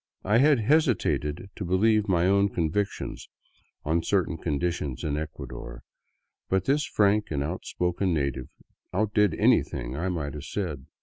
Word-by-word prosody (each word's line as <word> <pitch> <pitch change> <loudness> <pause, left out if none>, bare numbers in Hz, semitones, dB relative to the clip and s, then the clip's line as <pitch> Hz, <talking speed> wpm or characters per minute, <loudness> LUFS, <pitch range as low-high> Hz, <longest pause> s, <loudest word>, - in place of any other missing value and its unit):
I 105 +4 +3
had 140 -3 +5
hesitated 105 - +1
to - - -5
believe 105 +4 +2
my 90 -3 +2
own 100 +1 +3
convictions 95 +3 -2 0.6
on 80 +2 +1
certain 90 -1 0
conditions 80 -3 -2
in 75 -2 -1
Ecuador, 65 -5 -7 0.7
but 95 -1 +1
this 145 +2 +2
frank 105 0 +2
and 70 -2 -1
outspoken 90 +3 -2
native 70 -5 -1 0.4
outdid 105 -1 +2
anything - - +1
I 85 +6 -2
might 75 -6 -3
have 75 0 -7
said. 80 -8 -4
90 Hz, 135 wpm, -27 LUFS, 75-100 Hz, 0.7 s, had